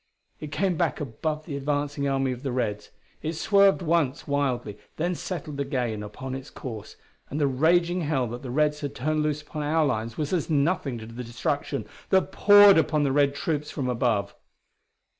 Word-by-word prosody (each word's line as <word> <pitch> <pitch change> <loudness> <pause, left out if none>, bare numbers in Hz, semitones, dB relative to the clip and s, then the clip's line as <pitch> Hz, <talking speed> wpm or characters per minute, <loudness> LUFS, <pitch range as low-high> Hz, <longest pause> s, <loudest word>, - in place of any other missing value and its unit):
It 150 -1 -7
came 185 +2 0
back 170 -1 0
above 150 +3 -3
the 145 - -5
advancing 145 0 -1
army 135 -1 +1
of 125 -1 -6
the 135 -2 -3
Reds. 105 -4 -2 0.3
It 160 +1 -2
swerved 200 +3 +4
once 155 -5 0
wildly, 130 -7 -1 0.2
then 175 +3 0
settled 155 -5 -5
again 125 -6 -2
upon 105 +6 -7
its 135 +1 -6
course, 110 -5 -8 0.3
and 145 - -3
the 145 - +3
raging 170 +6 +2
hell 145 -5 0
that 120 +2 -6
the 130 - -7
Reds 150 +3 +1
had 145 -2 -4
turned 155 +4 0
loose 150 0 -1
upon 150 0 -6
our 155 +2 +2
lines 110 -3 -2
was 150 +2 -2
as 175 -3 0
nothing 145 -3 +1
to 110 - -8
the 115 +2 -7
destruction 120 0 -2 0.2
that 190 0 +3
poured 205 -2 +7
upon 150 -1 +1
the 140 - +1
Red 140 0 +3
troops 150 -3 -2
from 135 -4 -3
above. 115 -5 0
145 Hz, 185 wpm, -26 LUFS, 125-155 Hz, 0.3 s, poured